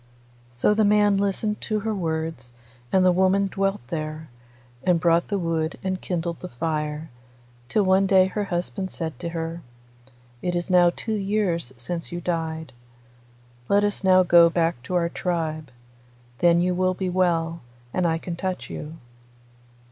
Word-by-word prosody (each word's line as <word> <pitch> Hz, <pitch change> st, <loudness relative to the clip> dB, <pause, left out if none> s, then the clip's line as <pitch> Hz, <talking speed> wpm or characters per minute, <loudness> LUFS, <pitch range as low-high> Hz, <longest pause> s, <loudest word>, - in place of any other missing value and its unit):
So 120 Hz, +12 st, +2 dB
the 215 Hz, +1 st, +2 dB
man 205 Hz, 0 st, +4 dB
listened 200 Hz, +2 st, -1 dB
to 215 Hz, -2 st, -1 dB
her 220 Hz, +1 st, -1 dB
words, 160 Hz, -8 st, -3 dB, 0.4 s
and 185 Hz, -1 st, +4 dB
the 180 Hz, -, +6 dB
woman 190 Hz, +2 st, +3 dB
dwelt 195 Hz, -7 st, -1 dB
there, 155 Hz, -1 st, -4 dB, 0.5 s
and 180 Hz, -2 st, +3 dB
brought 170 Hz, 0 st, +3 dB
the 205 Hz, -, -1 dB
wood 165 Hz, -3 st, -1 dB
and 185 Hz, -1 st, -2 dB
kindled 170 Hz, -2 st, -3 dB
the 180 Hz, -, -7 dB
fire, 150 Hz, +3 st, -3 dB, 0.6 s
till 210 Hz, -, +2 dB
one 190 Hz, +1 st, +4 dB
day 190 Hz, -1 st, +6 dB
her 205 Hz, +2 st, -2 dB
husband 185 Hz, +1 st, -3 dB
said 160 Hz, -4 st, -5 dB
to 170 Hz, -, -4 dB
her, 165 Hz, 0 st, -4 dB, 0.8 s
'It 180 Hz, -1 st, -1 dB
is 175 Hz, +2 st, -2 dB
now 175 Hz, -1 st, +6 dB
two 220 Hz, +5 st, -4 dB
years 195 Hz, -, -1 dB
since 165 Hz, +10 st, -5 dB
you 175 Hz, -, -4 dB
died. 160 Hz, -4 st, -3 dB, 1.0 s
Let 200 Hz, +1 st, +4 dB
us 205 Hz, -1 st, -1 dB
now 185 Hz, -1 st, +6 dB
go 170 Hz, -1 st, +7 dB
back 165 Hz, -5 st, 0 dB
to 180 Hz, -, -3 dB
our 170 Hz, -1 st, +2 dB
tribe. 160 Hz, -4 st, -3 dB, 0.7 s
Then 170 Hz, 0 st, +4 dB
you 180 Hz, +1 st, +1 dB
will 185 Hz, 0 st, +1 dB
be 185 Hz, -1 st, -2 dB
well, 170 Hz, -2 st, +1 dB, 0.3 s
and 180 Hz, -1 st, +1 dB
I 165 Hz, 0 st, +1 dB
can 170 Hz, +1 st, -5 dB
touch 185 Hz, +1 st, -4 dB
you. 155 Hz, +2 st, -7 dB
175 Hz, 165 wpm, -24 LUFS, 165-190 Hz, 1.0 s, go